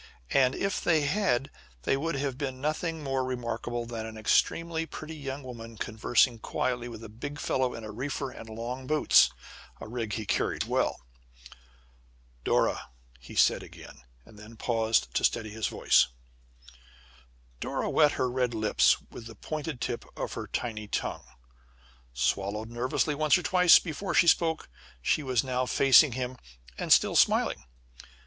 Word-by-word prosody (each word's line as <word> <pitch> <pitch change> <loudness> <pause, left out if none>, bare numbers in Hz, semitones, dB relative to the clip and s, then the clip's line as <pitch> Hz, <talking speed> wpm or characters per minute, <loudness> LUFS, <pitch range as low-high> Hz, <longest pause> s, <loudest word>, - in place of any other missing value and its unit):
And, 130 -1 +3
if 195 0 -2
they 160 -3 +3
had, 145 -4 0 0.3
they 135 - +2
would 165 +4 -2
have 135 -2 -2
seen 130 -2 -3
nothing 155 +2 -2
more 135 -1 -1
remarkable 120 -1 -3
than 115 -1 -5
an 110 0 -9
extremely 165 +8 +1
pretty 160 0 -8
young 140 -1 -6
woman 115 -3 -9
conversing 115 +3 +1
quietly 120 +1 -2
with 115 -1 -9
a - - -7
big 130 +7 -7
fellow 130 -1 0
in 115 - -8
a 110 - -7
reefer 135 +3 -4
and 115 - -11
long 120 +4 -6
boots 155 +1 +5 0.5
a - - -8
rig 115 -2 -4
he 110 0 -3
carried - - 0
well. - - -1 1.4
"Dora!" - - +1 0.3
he - - -12
said - - +4
again, - - -13 0.2
and 105 - -16
then 105 +1 -11
had 115 - -18
to - - -8
pause 115 -1 +3
to - - -3
steady 110 -2 +1
his 110 0 -2
voice. - - +3 1.5
Dora - - -2
wet 150 -2 +4
her 130 - 0
red 125 -1 -1
lips 110 -1 +3
with 115 - -9
the 115 - -11
pointed 155 -3 -5
tip 120 - -3
of - - -4
her - - -5
tiny 110 -3 -4
tongue; - - -3 0.8
swallowed 100 - -1
nervously 125 +5 0
once 155 +3 +3
or 180 - -5
twice, 180 -2 +7
before 180 +4 -3
she - - +6
spoke. 165 -1 +2 0.3
She 65 - +1
was 130 -5 0
now 130 -1 -1
facing 135 +1 +6
him, 125 0 -4 0.4
and - - -3
still - - +5
smiling. - - +3
125 Hz, 160 wpm, -28 LUFS, 115-145 Hz, 1.5 s, twice